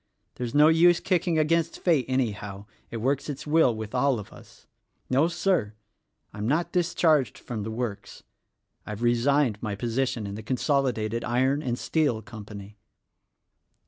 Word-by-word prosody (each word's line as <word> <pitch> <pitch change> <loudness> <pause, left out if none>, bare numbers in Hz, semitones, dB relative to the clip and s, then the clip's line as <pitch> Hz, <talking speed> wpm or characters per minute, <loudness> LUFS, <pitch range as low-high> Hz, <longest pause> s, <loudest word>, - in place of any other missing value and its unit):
There's 120 0 -5
no 150 +1 +7
use 165 +2 +5
kicking 175 -3 0
against 165 +1 +1
Fate, 160 -8 +2
anyhow; 105 -6 -2 0.2
it 115 - -5
works 135 +6 -1
its 145 0 -5
will 150 -6 +3
with 110 0 -7
all 130 0 +2
of 105 - -9
us. - - -17 0.5
No, 140 +5 +4
Sir! 170 - 0 0.6
I'm 105 +1 -4
not 155 +6 0
discharged 165 -5 +2
from 115 -3 -6
the 105 - -4
works. 110 -2 -5 0.6
I've 105 +2 -6
resigned 120 -1 +2
my 105 -3 -3
position 120 +1 -1
in 100 - -5
the 105 - -6
Consolidated 120 -2 0
Iron 130 +4 +1
and 125 -4 -2
Steel 140 -9 0
Company." 105 -2 -10
125 Hz, 145 wpm, -26 LUFS, 110-150 Hz, 0.6 s, no